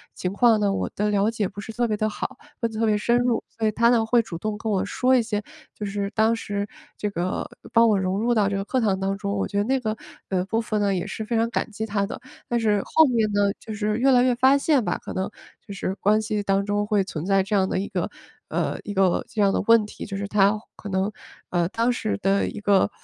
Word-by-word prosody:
情 180 +1 -3
况 225 0 +4
呢 205 -1 +2
我 - - -2
的 210 +1 0
了 205 +1 +2
解 220 -3 -1
不 205 +2 -8
是 225 - -7
特 240 +1 0
别 215 - 0
地 215 0 0
好， 255 +4 -5 0.2
问 230 -1 0
得 220 - -5
特 225 - +2
别 215 -1 +3
深 235 +3 +2
入。 245 -2 +1
所 225 - -1
以 - - +2
她 235 +2 +3
呢 235 -2 +3
会 235 +1 +4
主 190 -7 -7
动 210 +4 -3
跟 220 0 -3
我 195 -2 +1
说 255 +5 +2
一 250 - +4
些 210 -2 -2 0.3
就 210 - -6
是 200 0 -2
当 220 +1 +3
时 205 -2 -3 0.3
这 210 - -2
个 185 -2 -3 0.2
帮 230 0 +6
我 215 -2 +3
融 190 +1 -1
入 240 +2 +2
到 210 -4 +2
这 200 - -1
个 195 - -2
课 260 - 0
堂 200 -4 +1
当 195 +1 -1
中， 200 0 -3
我 195 - -1
觉 200 - -4
得 205 - +3
那 265 +5 +1
个， 220 -3 -2 0.3
呃， 185 -2 +1
部 225 +3 0
分 215 -2 -1
呢 200 -1 +2
也 180 -2 -2
是 220 - -5
非 235 +2 -2
常 230 +1 +1
感 190 -2 -2
激 220 +1 -4
她 200 -2 0
的。 200 - -7 0.3
但 240 - 0
是 210 -3 +2
后 320 - +5
面 230 -6 +1
呢， 205 0 +3
就 220 - -7
是 210 0 -1
越 265 +3 +4
来 245 -1 +5
越 255 -1 +3
发 260 +3 +5
现 280 -2 +2
吧， - - -1
可 - - -7
能 190 +1 -2 0.4
就 200 - -8
是 195 -1 -3
关 210 +2 +2
系 215 -1 -2
当 195 0 +1
中 205 0 0
会 205 -1 +2
存 170 -4 -5
在 195 0 +3
这 205 +2 -1
样 190 -1 +3
的 - - 0
一 200 - -3
个， - - -2 0.4
呃， - - -1
一 205 - -5
个 190 -2 +2
这 220 - -2
样 200 -1 +4
的 - - +1
问 230 -2 +6
题， 210 - -8
就 195 -1 -5
是 200 0 -3
她 200 +1 +3 0.2
可 205 - -8
能， 190 +2 0 0.4
呃， 175 -2 +1
当 230 +4 +1
时 220 -3 -2
的 195 +1 +2
一 - - -6
个， 205 -2 +3
210 Hz, 295 characters per minute, -24 LUFS, 200-230 Hz, 0.4 s, 帮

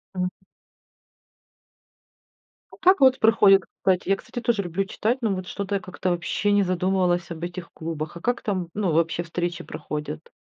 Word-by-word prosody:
Мгм. 180 0 0 2.4
А - - -14
как 380 +1 +5
вот 260 -1 +6
проходят 205 -4 +6 0.2
кстати, 185 0 +1
я, 195 - +5
кстати, 240 - -7
тоже 230 -4 +1
люблю 180 +3 -2
читать, 225 +5 -1
но 215 -4 +1
вот 185 -1 -5
что-то 200 +1 -3
я 195 - -1
как-то 185 0 -3
вообще 175 +4 0
не 205 -1 +4
задумывалась 180 -1 +1
об 165 0 -6
этих 175 0 -6
клубах. 160 -1 -5
А - - -11
как 245 0 0
там, 185 -5 -2
ну, 200 -4 0
вообще 165 +1 +1
встречи 175 +1 -3
проходят? 150 - -6
185 Hz, 165 wpm, -24 LUFS, 175-205 Hz, 2.4 s, вот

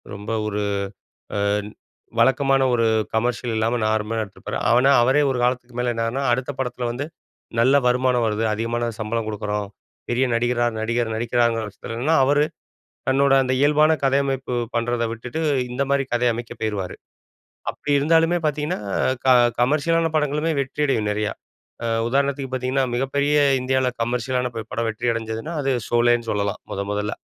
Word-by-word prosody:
ரொம்ப 105 +3 -6 0.2
ஒரு 105 0 -2 0.8
அன் 100 +1 0 0.5
வழக்கமான 135 +2 +3
ஒரு 115 -1 +2 0.3
கமர்ஷியல் 120 +1 0
இல்லாம 115 +2 +1
நார்மலா 110 +1 0
எடுத்திருப்பாரு. 100 - -7
ஆனா, 125 +4 +5
அவரே 135 +4 +3
ஒரு 125 - -1
காலத்துக்கு 125 0 -1
மேல 125 -1 +1
என்னன்னா, 115 +4 -1
அடுத்த 130 +2 -1
படத்துல 125 -1 -2
வந்து 135 +4 -4 0.6
நல்ல 130 +4 +5
வருமானம் 125 -1 +2
வருது, 110 +1 -1
அதிகமான 115 +2 -2
சம்பளம் 110 +1 -2
குடுக்குறோம், 105 -1 -3 0.4
பெரிய 125 +2 +2
நடிகரா 120 0 +1
நடிகர் 115 0 -1
நடிக்கிறாருங்கிற 115 -1 +1
பட்சத்துலனா, 120 +10 -1
அவரு 145 +2 +3 0.7
தன்னோட 135 +1 +3
அந்த 130 - 0
இயல்பான 150 +2 +4
கதையமைப்பு 135 -2 0 0.2
பண்றத 120 0 0
விட்டுட்டு, 125 +7 -5 0.3
இந்த 135 +3 0
மாரி 140 -1 +2
கதை 120 0 +2
அமைக்க 120 0 -7
போயிருவாரு. 100 -4 -3 0.7
அப்படி 145 - -5
இருந்தாலுமே 165 +3 +3
பாத்தீங்கன்னா, 150 +1 -2 0.5
க - - +1 0.3
கமர்ஷியலான 160 +5 +2
படங்களுமே 150 +2 0
வெற்றியடையும் 130 -6 0
நெறையா. 105 0 -1 0.5
அ - - 0 0.2
உதாரணத்துக்கு 140 0 0
பாத்தீங்கன்னா, 130 +1 0
மிகப்பெரிய 140 +3 +1 0.3
இந்தியாவுல 130 0 +1
கமர்ஷியலான 125 +1 -1
ப 110 - -4
படம் 115 0 -1
வெற்றி 115 +2 -1
அடைஞ்சதுனா, 115 +7 -4
அது 135 -1 +1 0.2
சோலேன்னு 120 -1 +2
சொல்லலாம் 100 0 -1
மொத 100 - -2
மொதல்ல. 105 +1 -2
120 Hz, 140 wpm, -22 LUFS, 115-135 Hz, 0.8 s, ஆனா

